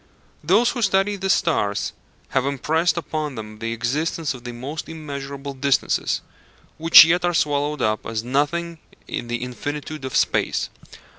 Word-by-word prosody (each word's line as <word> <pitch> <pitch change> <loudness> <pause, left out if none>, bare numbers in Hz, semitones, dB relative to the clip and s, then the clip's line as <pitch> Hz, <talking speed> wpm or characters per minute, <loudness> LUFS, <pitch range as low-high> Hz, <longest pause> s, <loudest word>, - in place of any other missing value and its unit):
Those 210 +10 +4
who 245 - -4
study 195 -1 +2
the 195 -1 -3
stars - - +1 0.4
have 135 - +1
impressed 160 +6 +1
upon 155 -4 -3
them 110 -1 -8
the 115 0 -3
existence 145 +7 -1
of 125 -2 -11
the 120 - -4
most 135 +6 -6
immeasurable 140 -3 -6
distances, 135 0 +1 0.6
which 165 0 +10
yet 175 +2 +2
are 175 -1 +1
swallowed 145 -2 0
up 110 0 0
as 110 -1 -3
nothing 160 +6 -1 0.3
in 120 - -4
the 120 0 -3
infinitude 145 +4 -5
of 130 - -4
space. - - +1
145 Hz, 150 wpm, -22 LUFS, 125-165 Hz, 0.6 s, which